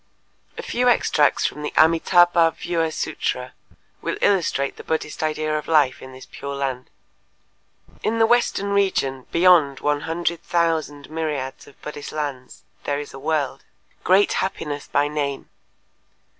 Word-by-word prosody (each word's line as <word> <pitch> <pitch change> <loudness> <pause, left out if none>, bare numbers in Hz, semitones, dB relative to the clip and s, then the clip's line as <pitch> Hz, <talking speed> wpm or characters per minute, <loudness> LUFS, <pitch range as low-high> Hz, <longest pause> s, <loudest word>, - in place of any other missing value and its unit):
A - - -5
few 250 +1 +1
extracts 150 -10 +3
from 150 - -2
the 150 - -3
Amitâbha 165 +1 +4
Vyûha 170 -2 -1
Sûtra 125 -4 -3 0.5
will - - -3
illustrate 165 -8 +1
the - - -9
Buddhist 160 -1 -3
idea 155 0 -1
of 150 - -3
life 150 -5 +3
in 130 - -10
this 130 0 -12
Pure 140 0 -7
Land: 130 -2 -3 1.1
"In 225 +1 0
the 225 - +5
western 225 -4 +1
region 135 -10 0
beyond 170 -6 +4
one 145 0 0
hundred 170 +1 -2
thousand 160 -4 -1
myriads 150 -5 -4
of - - -18
Buddhist 145 -1 -7
lands 140 -4 -5 0.2
there 145 0 -1
is 145 - -8
a 135 - -9
world. 150 -2 -1 0.4
Great 195 +3 +4
Happiness 150 -6 -3
by 145 +1 +1
name. 145 -2 -3
155 Hz, 145 wpm, -22 LUFS, 140-170 Hz, 1.1 s, the